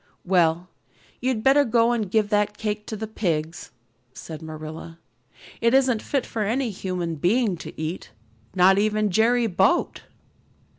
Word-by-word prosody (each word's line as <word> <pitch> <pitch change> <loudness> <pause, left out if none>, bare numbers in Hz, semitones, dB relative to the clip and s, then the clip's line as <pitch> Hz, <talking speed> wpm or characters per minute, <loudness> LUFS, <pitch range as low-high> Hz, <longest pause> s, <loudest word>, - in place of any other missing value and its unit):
"Well, 175 -1 +2 0.5
you'd 245 -3 -1
better 275 +2 +5
go 235 -1 +2
and 220 -5 -1
give 215 +1 +1
that 210 0 0
cake 210 -1 -4
to 220 - -4
the 220 +1 -5
pigs," 165 -7 -3 0.4
said 155 +2 -9
Marilla. 155 +1 -8 0.6
"It 230 +2 +3
isn't 255 -5 +3
fit 275 -3 -2
for 225 - -4
any 230 +4 0
human 180 -4 -4 0.4
to - - -10
eat, 160 +3 -5 0.5
not 190 +1 +5
even 215 0 +1
Jerry 235 +5 +3
Boute." 195 - +1
CHAPTER - - -16
XXII. - - -34
210 Hz, 150 wpm, -24 LUFS, 175-230 Hz, 0.6 s, better